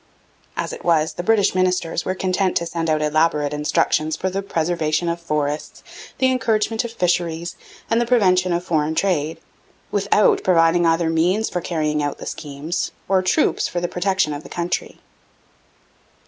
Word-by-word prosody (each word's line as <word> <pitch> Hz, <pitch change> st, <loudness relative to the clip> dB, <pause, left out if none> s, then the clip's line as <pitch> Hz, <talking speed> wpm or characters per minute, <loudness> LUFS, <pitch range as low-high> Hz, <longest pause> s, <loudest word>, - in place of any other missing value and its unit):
As -, -, -2 dB
it -, -, -9 dB
was, 160 Hz, -2 st, +2 dB
the -, -, -4 dB
British 215 Hz, +1 st, +3 dB
ministers 180 Hz, -3 st, 0 dB
were 185 Hz, -, -1 dB
content 185 Hz, 0 st, 0 dB
to 170 Hz, -, -1 dB
send 165 Hz, -1 st, -3 dB
out 155 Hz, -1 st, +1 dB
elaborate 150 Hz, -1 st, +1 dB
instructions 150 Hz, +1 st, +1 dB
for 190 Hz, -, -2 dB
the 195 Hz, +1 st, -2 dB
preservation 165 Hz, -3 st, -1 dB
of 170 Hz, 0 st, -2 dB
forests, 150 Hz, -2 st, -3 dB, 0.3 s
the 260 Hz, 0 st, +3 dB
encouragement 225 Hz, -3 st, 0 dB
of 235 Hz, -, -5 dB
fisheries 175 Hz, -4 st, -1 dB, 0.3 s
and 230 Hz, +1 st, +2 dB
the 240 Hz, -, -1 dB
prevention 185 Hz, -7 st, +3 dB
of 175 Hz, 0 st, 0 dB
foreign 160 Hz, -3 st, 0 dB
trade, 160 Hz, -4 st, 0 dB, 0.5 s
without 440 Hz, -5 st, +3 dB
providing 170 Hz, -1 st, +4 dB
either 165 Hz, 0 st, +2 dB
means 180 Hz, +7 st, +1 dB
for 180 Hz, -, -2 dB
carrying 155 Hz, -3 st, -1 dB
out 145 Hz, -1 st, -2 dB
the -, -, -9 dB
schemes, 150 Hz, +3 st, -4 dB, 0.2 s
or 190 Hz, -1 st, +3 dB
troops 185 Hz, -, +1 dB
for 175 Hz, -, -3 dB
the 175 Hz, -, -1 dB
protection 190 Hz, -3 st, 0 dB
of 145 Hz, -, -5 dB
the -, -, -13 dB
country. 175 Hz, 0 st, -3 dB
170 Hz, 165 wpm, -21 LUFS, 155-185 Hz, 0.5 s, providing